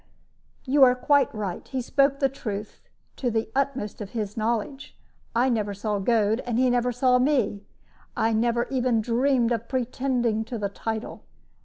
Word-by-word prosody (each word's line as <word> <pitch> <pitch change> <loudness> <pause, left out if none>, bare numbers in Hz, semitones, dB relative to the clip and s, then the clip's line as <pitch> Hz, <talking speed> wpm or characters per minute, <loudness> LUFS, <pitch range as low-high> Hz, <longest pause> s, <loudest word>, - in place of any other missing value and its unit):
"You 275 +1 +4
are 250 -1 +6
quite 285 +2 +3
right; 205 -5 -5
he 265 - -3
spoke 275 +2 +2
the 275 - +2
truth 215 -6 -6 0.4
to 250 - -1
the 225 -1 -2
utmost 270 -7 -2
of 200 - -7
his 210 -2 -3
knowledge. 230 +5 -3 0.4
I 245 +3 +3
never 210 -5 -1
saw 210 0 -2
Goad, 220 +1 +2
and 235 -2 0
he 255 0 +3
never 245 0 +1
saw 250 +1 +3
me. 250 -7 +1 0.6
I 225 +1 +2
never 235 +2 +1
even 250 -3 +1
dreamed 245 +1 +1
of 230 -1 -2
pretending 250 -3 0
to 235 +1 -5
the 205 -2 -2
title. 220 +2 -5
235 Hz, 165 wpm, -25 LUFS, 220-260 Hz, 0.6 s, are